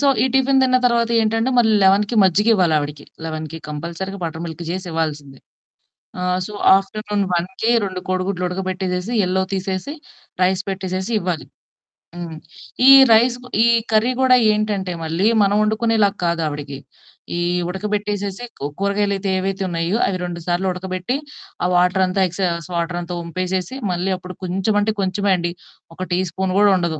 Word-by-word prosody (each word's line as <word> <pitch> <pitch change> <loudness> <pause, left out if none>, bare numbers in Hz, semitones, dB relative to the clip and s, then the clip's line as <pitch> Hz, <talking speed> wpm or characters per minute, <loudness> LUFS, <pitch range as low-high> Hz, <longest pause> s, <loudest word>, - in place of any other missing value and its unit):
So 285 - +2 0.2
ఈ - - +3
tiffin 270 0 +3
తిన్న 255 -1 +3
తరువాతేంటంటే 230 0 +1
మళ్ళీ 220 -2 +4
11కి 205 +4 +3
మజ్జిగివ్వాలి 175 -7 +2 0.2
ఆవిడకి. 155 0 -5
కంపల్సరీగా 170 +6 -5
బటర్ 165 0 -5
మిల్క్ 170 +1 -7
చేసి 185 +1 -4
ఇవ్వాల్సిందే. 150 -4 -3 0.8
ఆహ్, 180 0 0
సో, - - -9 0.2
ఆఫ్టర్‌నూన్ 205 +1 -2
1కి 190 +6 -1 0.2
2 185 -1 -5
కోడిగుడ్లు 185 0 -1
ఉడకబెట్టేసేసి 185 +2 -3
యెల్లో 185 0 +1
తీసేసి 190 +8 -3 0.5
రైస్ 185 +1 +2
పెట్టేసేసి 190 +2 -3
ఇవ్వాలి. 175 -3 -3 0.7
హ్మ్. 170 -2 -6 0.5
ఈ - - +11 0.2
రైస్ 240 +2 +4 0.3
ఈ - - +4 0.2
కర్రీ 220 +3 +3
గూడా 255 -1 +6 0.2
ఏంటంటే 210 -3 -1
మళ్ళీ, 165 +4 -1 0.2
మనం 200 +1 +2
వండుకునేలాగా 215 -2 +1
కాదు 170 -1 0
ఆవిడకి. 145 -2 -6 0.6
ఈ - - -1 0.3
ఉడకబెట్టేసేసి, 205 +2 -3 0.4
కూరగాయలయితే 200 0 0
ఏవైతే 195 +1 -2
ఉన్నాయో 170 +4 -1
అవి 185 - -1
2 175 -1 -4
సార్లు 175 +2 0
ఉడకబెట్టి, 185 +5 -3 0.5
ఆ - - +2
వాటరంతా 185 +1 +2
ఎక్సెస్ 175 -2 -2
వాటరంతా 175 +1 -3
వంపేసేసి, 185 +6 -3 0.2
మళ్ళీ 180 +2 -1
అప్పుడు 180 0 -10
కొంచెం 190 +4 -1
అంటే 215 +1 0
కొంచెమే 195 +1 0
అండి 170 0 -2 0.4
ఒక 185 - -4
టీ 175 - +2
స్పూను 185 +2 -2
గూడా 205 -1 +5
ఉండదు. 170 -3 -2
185 Hz, 140 wpm, -20 LUFS, 175-205 Hz, 0.8 s, ఈ